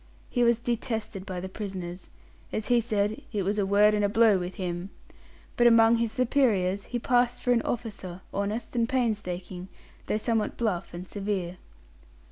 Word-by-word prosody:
He 245 Hz, -, +2 dB
was 235 Hz, -1 st, +4 dB
detested 225 Hz, -4 st, -3 dB
by 185 Hz, -2 st, -4 dB
the 190 Hz, -, -4 dB
prisoners 185 Hz, -3 st, -6 dB, 0.4 s
as 215 Hz, -, -2 dB
he 240 Hz, -1 st, +5 dB
said, 215 Hz, -1 st, -1 dB
"it 205 Hz, -3 st, -1 dB
was 205 Hz, +3 st, 0 dB
a 195 Hz, -, +1 dB
word 205 Hz, +2 st, +5 dB
and 210 Hz, -1 st, +1 dB
a 205 Hz, -, +3 dB
blow 220 Hz, -2 st, +5 dB
with 180 Hz, +1 st, -5 dB
him" 180 Hz, 0 st, -4 dB, 0.7 s
but, 240 Hz, -, +5 dB
among 230 Hz, 0 st, +6 dB
his 230 Hz, -1 st, 0 dB
superiors, 220 Hz, -7 st, +2 dB
he 245 Hz, -, -3 dB
passed 245 Hz, 0 st, +1 dB
for 245 Hz, -, +2 dB
an 235 Hz, -1 st, +4 dB
officer, 200 Hz, -7 st, -4 dB
honest 205 Hz, +5 st, -3 dB
and 230 Hz, 0 st, +1 dB
painstaking, 190 Hz, -7 st, -2 dB, 0.4 s
though -, -, +1 dB
somewhat 225 Hz, -1 st, -1 dB
bluff 200 Hz, -7 st, -2 dB
and 180 Hz, +1 st, -7 dB
severe. 195 Hz, -3 st, -3 dB
210 Hz, 170 wpm, -27 LUFS, 190-235 Hz, 0.7 s, among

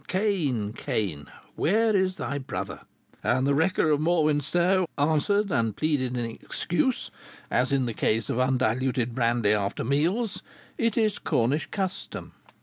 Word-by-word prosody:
Cain! 155 Hz, -, 0 dB
Cain! 80 Hz, -11 st, -3 dB, 0.3 s
where 220 Hz, +5 st, +2 dB
is 185 Hz, -1 st, +2 dB
thy 140 Hz, -5 st, -3 dB
brother? 100 Hz, -7 st, -5 dB, 0.4 s
And 130 Hz, +1 st, +2 dB
the 140 Hz, -, +3 dB
wrecker 160 Hz, +1 st, +2 dB
of 150 Hz, 0 st, +2 dB
Morwenstow 170 Hz, +3 st, +2 dB
answered 160 Hz, +8 st, +2 dB
and 115 Hz, -6 st, +1 dB
pleaded 130 Hz, -5 st, 0 dB
in 120 Hz, -, -1 dB
excuse, 175 Hz, -, -2 dB, 0.4 s
as 125 Hz, +2 st, +2 dB
in 135 Hz, -2 st, +2 dB
the 115 Hz, -, -3 dB
case 110 Hz, 0 st, 0 dB
of 120 Hz, -, -1 dB
undiluted 130 Hz, -1 st, +1 dB
brandy 115 Hz, -3 st, +2 dB
after 100 Hz, -1 st, -1 dB
meals, 170 Hz, -, 0 dB, 0.4 s
'It 230 Hz, -1 st, +1 dB
is 215 Hz, -3 st, +2 dB
Cornish 130 Hz, +7 st, 0 dB
custom.' 190 Hz, -2 st, -4 dB
140 Hz, 140 wpm, -26 LUFS, 120-185 Hz, 0.4 s, the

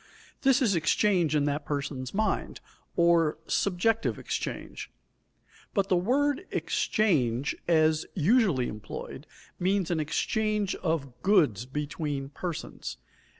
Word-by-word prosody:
This 270 Hz, 0 st, +4 dB
is 215 Hz, -5 st, +3 dB
exchange 170 Hz, -, +2 dB
in 145 Hz, -1 st, +2 dB
that 145 Hz, +1 st, -1 dB
person's 140 Hz, -3 st, -3 dB
mind, 215 Hz, +2 st, -1 dB, 0.4 s
or 170 Hz, -2 st, +3 dB
subjective 205 Hz, +6 st, +1 dB
exchange. -, -, -5 dB, 0.9 s
But 195 Hz, -2 st, +1 dB
the 185 Hz, -, +4 dB
word 280 Hz, -, +1 dB
"exchange" 140 Hz, -, +1 dB
as 155 Hz, -2 st, +3 dB
usually 180 Hz, -, +3 dB
employed 105 Hz, -1 st, -7 dB, 0.3 s
means 185 Hz, -1 st, +1 dB
an 165 Hz, -, +1 dB
exchange 210 Hz, +6 st, 0 dB
of 140 Hz, -8 st, -3 dB
goods 150 Hz, -, +3 dB
between 145 Hz, 0 st, -3 dB
persons. 170 Hz, +2 st, -6 dB
170 Hz, 105 wpm, -28 LUFS, 145-205 Hz, 0.9 s, This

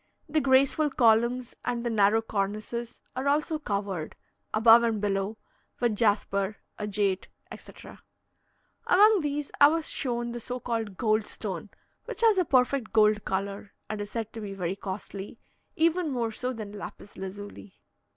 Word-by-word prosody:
The 310 Hz, 0 st, +1 dB
graceful 275 Hz, +3 st, +3 dB
columns 235 Hz, 0 st, +2 dB
and 245 Hz, -1 st, -2 dB
the 235 Hz, -, 0 dB
narrow 215 Hz, +1 st, +3 dB
cornices 215 Hz, +3 st, -3 dB
are 260 Hz, +2 st, -2 dB
also 305 Hz, +2 st, +1 dB
covered, 200 Hz, -, -3 dB, 0.4 s
above 225 Hz, +2 st, +7 dB
and 230 Hz, -2 st, 0 dB
below, 200 Hz, +1 st, -1 dB, 0.4 s
with 235 Hz, -3 st, +1 dB
jasper, 205 Hz, -2 st, +1 dB, 0.2 s
agate, 205 Hz, -2 st, 0 dB, 0.2 s
etc. -, -, -12 dB, 0.9 s
Among 420 Hz, +2 st, +6 dB
these, 295 Hz, -2 st, -3 dB
I 285 Hz, -, +11 dB
was 320 Hz, +1 st, -1 dB
shown 240 Hz, -3 st, -2 dB
the 240 Hz, -, -5 dB
so 250 Hz, +2 st, -5 dB
called 225 Hz, -5 st, -3 dB
"goldstone," 215 Hz, -4 st, -1 dB, 0.4 s
which -, -, -5 dB
has 445 Hz, -4 st, +5 dB
a 365 Hz, -, +2 dB
perfect 255 Hz, -3 st, +2 dB
gold 215 Hz, -1 st, +3 dB
colour, 200 Hz, +1 st, -3 dB, 0.2 s
and 215 Hz, -1 st, -3 dB
is 205 Hz, -, -5 dB
said 225 Hz, -1 st, -4 dB
to 225 Hz, -, -6 dB
be 200 Hz, -2 st, -6 dB
very 180 Hz, -1 st, -2 dB
costly, 200 Hz, +1 st, -7 dB, 0.4 s
even 335 Hz, +1 st, +2 dB
more 240 Hz, -4 st, -1 dB
so 250 Hz, +3 st, -3 dB
than 215 Hz, -4 st, -7 dB
lapis 205 Hz, 0 st, -9 dB
lazuli. 200 Hz, +1 st, -8 dB
225 Hz, 150 wpm, -28 LUFS, 205-255 Hz, 0.9 s, I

